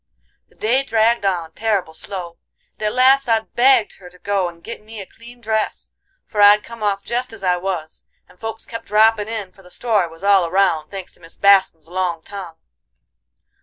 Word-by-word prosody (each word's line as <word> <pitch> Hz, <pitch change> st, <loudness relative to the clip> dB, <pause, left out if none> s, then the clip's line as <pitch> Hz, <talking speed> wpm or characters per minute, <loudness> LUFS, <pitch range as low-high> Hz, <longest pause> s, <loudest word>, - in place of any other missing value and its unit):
"The -, -, -27 dB
day 240 Hz, +5 st, +2 dB
dragged 225 Hz, -4 st, +2 dB
on 170 Hz, -4 st, -2 dB
terrible 200 Hz, -4 st, -1 dB
slow, 175 Hz, -1 st, -8 dB, 0.3 s
and -, -, -22 dB
at -, -, 0 dB
last 265 Hz, +1 st, +4 dB
I 225 Hz, -1 st, +3 dB
begged 240 Hz, 0 st, +2 dB
her 180 Hz, -2 st, -13 dB
to 180 Hz, -, -19 dB
go 195 Hz, -1 st, -1 dB
and 170 Hz, -1 st, -16 dB
git 230 Hz, -, -7 dB
me 220 Hz, 0 st, -10 dB
a 195 Hz, -, -7 dB
clean 240 Hz, +4 st, -16 dB
dress, 220 Hz, -1 st, -2 dB, 0.3 s
for 210 Hz, -, -2 dB
I'd 205 Hz, +1 st, +7 dB
come 230 Hz, -1 st, -11 dB
off 200 Hz, -1 st, 0 dB
jest 245 Hz, +3 st, -2 dB
as 215 Hz, -3 st, -10 dB
I 180 Hz, -1 st, +2 dB
was, 175 Hz, -4 st, -5 dB, 0.2 s
and 180 Hz, -, -22 dB
folks 225 Hz, 0 st, -5 dB
kep' 230 Hz, -, -7 dB
droppin' 215 Hz, 0 st, +3 dB
in, 215 Hz, -4 st, -5 dB
for 195 Hz, -, -19 dB
the 180 Hz, -, -17 dB
story 210 Hz, -3 st, 0 dB
was 165 Hz, +2 st, -14 dB
all 195 Hz, -4 st, +4 dB
round, 170 Hz, -4 st, +1 dB
thanks 195 Hz, -2 st, -8 dB
to -, -, -22 dB
Mis 165 Hz, -1 st, -15 dB
Bascum's 190 Hz, -5 st, +4 dB
long 175 Hz, -2 st, -2 dB
tongue. 190 Hz, -5 st, -8 dB
200 Hz, 200 wpm, -20 LUFS, 180-225 Hz, 0.3 s, I'd